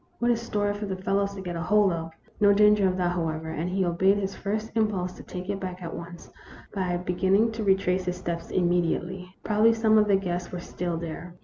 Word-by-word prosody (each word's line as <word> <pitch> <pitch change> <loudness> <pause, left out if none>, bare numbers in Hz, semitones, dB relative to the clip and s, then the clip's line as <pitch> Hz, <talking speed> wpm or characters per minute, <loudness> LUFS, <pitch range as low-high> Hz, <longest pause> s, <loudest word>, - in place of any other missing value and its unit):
What 240 0 +2
a - - +3
story 210 -3 -1
for 205 0 -5
the 190 - -2
fellows 200 +1 -1
to 195 - -6
get 175 -2 -5
hold 190 +3 +3
of! 165 0 -4 0.3
No 205 -1 +6
danger 210 -1 +5
of 185 0 0
that, 175 -1 +1
however; 160 -2 -2
and 165 +3 -3
he 190 0 0
obeyed 190 +3 +3
his 195 -1 -2
first 215 +2 -3
impulse 210 -5 0
to - - -11
take 180 0 -7
it 200 0 -2
back 185 -1 -6
at 165 - -5
once, 170 0 -9 0.4
by 185 -3 -1
beginning 190 +5 +2
to 220 0 -4
retrace 190 -2 +2
his 180 0 -2
steps 170 -2 -4
immediately. 180 +1 0
Probably 215 +2 +4
some 220 -1 +4
of 210 - +3
the 200 - +4
guests 180 -2 -2
were 180 - -4
still 175 -1 -4
there. 170 +1 -7
185 Hz, 220 wpm, -26 LUFS, 175-205 Hz, 0.4 s, No